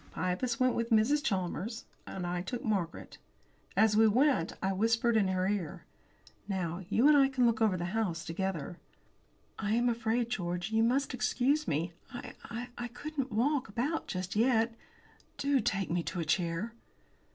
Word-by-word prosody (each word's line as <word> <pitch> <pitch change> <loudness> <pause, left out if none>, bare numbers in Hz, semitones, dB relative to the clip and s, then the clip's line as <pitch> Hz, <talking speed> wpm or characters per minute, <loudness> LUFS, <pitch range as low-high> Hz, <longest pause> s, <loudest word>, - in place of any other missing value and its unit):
Pybus 185 +7 -1
went 255 -1 +3
with 230 0 -1
Mrs. 245 +7 +3
Chalmers, 200 - -2 0.2
I 175 -1 -3
took 235 +6 -5
Margaret. 190 -7 -2 0.6
As 220 -1 +5
we 220 +1 +6
went 245 - +3
I 190 0 0
whispered 230 +3 +2
in 210 -3 +4
her 185 0 0
ear: 195 -6 -3 0.6
"Now, 185 -2 -2
you 235 +6 +4
and 300 - +7
I 275 -1 +5
can 260 -2 +2
look 230 -1 +2
over 210 -4 +3
the 175 - -3
house 185 -7 -1
together." 175 -1 -3 0.8
"I 210 0 0
am 240 +1 +3
afraid, 230 0 0
George, 180 -2 -2
you 220 0 +3
must 255 +5 +2
excuse 255 +4 +1
me. 165 +4 -1 0.2
I 245 - -7 0.5
I 240 - -2
couldn't 270 +2 -5
walk 260 +4 +1
about 260 +10 -2
just 185 +1 -4
yet. 230 0 +3 0.6
Do 280 -1 +2
take 195 -5 -1
me 175 0 +1
to 175 - -4
a 165 - -1
chair!" 170 +6 0
220 Hz, 165 wpm, -31 LUFS, 185-245 Hz, 0.8 s, and